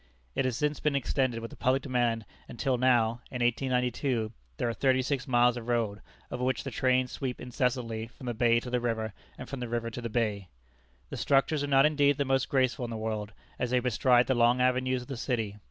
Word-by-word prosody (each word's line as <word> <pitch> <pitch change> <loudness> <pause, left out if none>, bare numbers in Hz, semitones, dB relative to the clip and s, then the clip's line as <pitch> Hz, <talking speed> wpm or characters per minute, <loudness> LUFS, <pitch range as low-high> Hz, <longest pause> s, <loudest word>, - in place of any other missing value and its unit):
It 130 - 0
has 125 -2 -1
since 150 -1 0
been 150 -2 0
extended 130 -3 0
with 115 - -7
the - - -10
public 130 +1 +1
demand, 120 -4 0 0.2
until 130 +2 -1
now 120 -2 +2
(in 125 -2 -2
1892) 125 -1 0 0.3
there - - -1
are 115 - -1
thirty 130 +1 +2
six 135 0 -2
miles 120 -1 +3
of 120 -1 -7
road, 110 -5 0 0.3
over 125 - -3
which 130 +1 0
the 135 - -5
trains 130 +1 +1
sweep 130 -3 -4
incessantly 120 -2 -2
from 130 +2 -13
the 120 - -2
bay 115 +1 +3
to 125 - -7
the 125 - +1
river, 110 -3 -2 0.2
and - - -8
from 135 - -6
the 120 -1 -4
river 115 0 -2
to 125 - -6
the 115 - -4
bay. 105 -4 -1 0.6
The - - -4
structures 140 +2 +2
are - - -1
not 135 0 +5
indeed 145 -2 +3
the 140 - 0
most 135 -1 +1
graceful 130 -1 +1
in - - -6
the 115 - -4
world, 110 -1 -3 0.3
as 125 - -1
they 125 +1 +3
bestride 125 0 +3
the 130 - +1
long 120 0 +3
avenues 130 0 +1
of - - -16
the 135 - -5
city. 115 -5 -2
125 Hz, 225 wpm, -29 LUFS, 115-130 Hz, 0.6 s, not